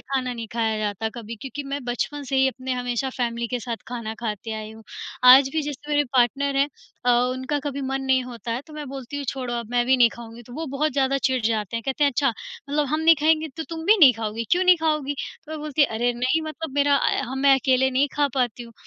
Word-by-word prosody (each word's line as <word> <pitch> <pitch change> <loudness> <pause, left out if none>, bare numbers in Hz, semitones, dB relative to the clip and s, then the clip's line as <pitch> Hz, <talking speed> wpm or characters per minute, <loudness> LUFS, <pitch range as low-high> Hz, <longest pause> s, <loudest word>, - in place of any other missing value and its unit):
खाना 260 -2 -2
नहीं 230 -2 -6
खाया 225 -2 0
जाता 215 +1 -2
कभी, 230 -1 -7
क्योंकि 280 +2 -6
मैं 280 +1 -4
बचपन 265 +4 -3
से 270 0 -2
ही 265 0 +4
अपने 260 +1 -5
हमेशा 250 +1 -2
फ़ैमिली 235 -1 -1
के 250 - -2
साथ 235 -1 -4
खाना 230 -2 -5
खाते 220 -1 -4
आई 215 0 -6
हूँ। 225 - -13 0.4
आज 260 +2 +9
भी 315 -1 0
जैसे 290 0 -6
मेरे 290 0 +3
पार्टनर 275 +3 +2
हैं 280 +1 +3 0.4
अ, 245 - +4
उनका 255 +4 +1
कभी 280 -1 -4
मन 270 0 -2
नहीं 265 -1 +2
होता 240 -1 -7
है, 240 - -2
तो 310 - -14
मैं 300 -1 -6
बोलती 270 +1 -7
हूँ, 285 - -4
"छोड़ो, 250 -2 -3
अब 235 -1 -5
मैं 240 0 +2
भी 260 0 +4
नहीं 240 -2 +6
खाऊँगी।" 235 0 -11
तो 240 - -14
वो 320 +3 -4
बहुत 305 +2 0
ज़्यादा 275 -1 +1
चिढ़ 260 -1 +1
जाते 220 -1 -1
हैं, 230 - -4
कहते 270 +2 +1
हैं, 285 - +4
"अच्छा, 275 +2 +1 0.4
मतलब 290 0 +1
हम 310 +3 0
नहीं 325 +1 +6
खाएँगे, 315 0 +2
तो 320 - -3
तुम 325 -1 -6
भी 430 +2 +6
नहीं 270 -6 +9
खाओगी? 225 0 -4
क्यों 360 +1 +3
नहीं 365 -1 +7
खाओगी?" 305 -3 0
तो 305 +3 -9
मैं 315 - -5
बोलती 300 0 +1
है, 280 - +5
"अरे! 240 +1 +1
नहीं, 255 +6 0
मतलब 310 -2 -6
मेरा 285 0 +3
अ - - +1
ह - - -3
मैं 280 -1 +7
अकेले 265 0 +2
नहीं 270 +2 +2
खा 290 -1 +2
पाती 245 -2 -1
हूँ।" 230 -1 -12
265 Hz, 255 wpm, -24 LUFS, 240-285 Hz, 0.4 s, आज